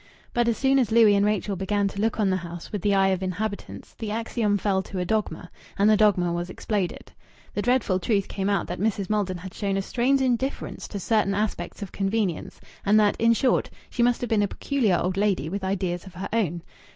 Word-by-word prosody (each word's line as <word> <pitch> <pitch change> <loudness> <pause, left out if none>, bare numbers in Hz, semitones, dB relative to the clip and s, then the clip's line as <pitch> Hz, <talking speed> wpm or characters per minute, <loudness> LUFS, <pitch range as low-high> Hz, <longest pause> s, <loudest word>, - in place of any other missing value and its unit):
But 240 -1 +2
as 235 - +1
soon 270 0 +3
as 235 -4 +1
Louis 225 -2 +6
and 200 0 +3
Rachel 210 -1 0
began 200 +2 0
to 200 +1 -5
look 225 +1 0
on 200 -3 +2
the 185 - +1
house 170 -1 -8
with 205 - -3
the 200 +1 +2
eye 195 0 +4
of 190 -1 0
inhabitants, 200 +3 -4
the 220 - -6
axiom 220 -1 0
fell 195 -1 +1
to 190 - -8
a 180 - -1
dogma, 180 -4 -2 0.3
and 200 - +4
the 215 - +6
dogma 195 -5 +3
was 175 +1 -3
exploded. 195 -1 -3 0.4
The 205 - -1
dreadful 245 -6 +2
truth 200 +1 0
came 195 0 -2
out 200 -3 +1
that 175 - -5
Mrs. 200 -1 -1
Maldon 200 -4 0
had 185 +2 -9
shown 195 -2 -1
a - - +1
strange 255 +6 +1
indifference 260 +1 -1
to 205 - -5
certain 200 0 +1
aspects 205 -2 -3
of 195 - -8
convenience, 195 -3 -2 0.2
and 210 +2 +4
that, 210 -1 +3
in 230 0 +5
short, 255 +3 +1 0.2
she 245 - -1
must 240 0 +3
have 245 - -3
been 215 -2 +3
a 205 - +2
peculiar 225 -6 0
old 185 +1 -1
lady 195 -7 +1
with 195 +2 -4
ideas 185 -1 -2
of 185 - -12
her 190 +2 -5
own. 175 -7 0
200 Hz, 225 wpm, -25 LUFS, 190-220 Hz, 0.4 s, Louis